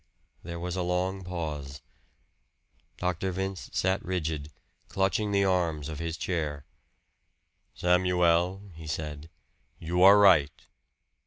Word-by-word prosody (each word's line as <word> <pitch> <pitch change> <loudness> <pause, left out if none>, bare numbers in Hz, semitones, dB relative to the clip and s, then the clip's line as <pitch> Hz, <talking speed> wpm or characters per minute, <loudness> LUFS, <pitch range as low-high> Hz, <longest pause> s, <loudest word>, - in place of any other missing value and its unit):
There 85 0 -7
was 90 +1 -4
a 95 - -1
long 90 +2 -1
pause. 75 -7 -5 1.1
Dr. 90 +1 -1
Vince 95 0 -4
sat 95 +1 0
rigid, 80 -5 -3 0.4
clutching 95 +2 0
the 100 -1 +3
arms 85 -6 0
of 75 -2 -6
his 85 -1 -3
chair. 75 -6 -3 1.1
"Samuel," 90 +1 +2
he 80 0 -10
said, 75 0 -5 0.5
"you 85 +2 -2
are 100 +2 +9
right. 85 -8 +4
90 Hz, 110 wpm, -28 LUFS, 80-95 Hz, 1.1 s, are